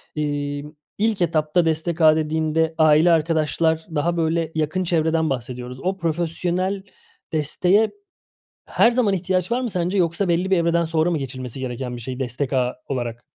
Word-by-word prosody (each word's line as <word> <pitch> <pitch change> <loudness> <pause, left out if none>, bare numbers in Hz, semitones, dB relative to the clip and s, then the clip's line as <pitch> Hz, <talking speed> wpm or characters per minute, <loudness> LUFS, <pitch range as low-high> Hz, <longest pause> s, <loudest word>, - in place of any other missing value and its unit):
Emm, 145 -1 -3 0.3
ilk 215 -2 0
etapta 165 0 +2
destek 160 +1 -1
ağı 155 -1 +7
dediğinde 160 +1 0
aile, 155 +2 +5
arkadaşlar, 160 0 +1
daha 170 +4 0
böyle 165 0 0
yakın 155 +4 0
çevreden 160 -2 +1
bahsediyoruz. 125 0 -5
O 190 +2 -1
profesyonel 175 +3 -1 0.5
desteğe 180 +7 +2 0.7
her 230 - +3
zaman 235 -5 +2
ihtiyaç 185 0 -1
var 245 +2 +1
mı 250 - -2
sence 180 0 -1
yoksa 175 +2 +1
belli 175 +2 0
bir 190 - +5
evreden 170 0 +2
sonra 160 +1 +1
mı 165 - 0
geçilmesi 130 -2 -6
gereken 125 -1 -4
bir 120 - -8
şey 125 +2 -6
destek 130 +2 -3
ağı 125 -1 +1
olarak? 120 -3 -4
160 Hz, 155 wpm, -22 LUFS, 145-175 Hz, 0.7 s, ağı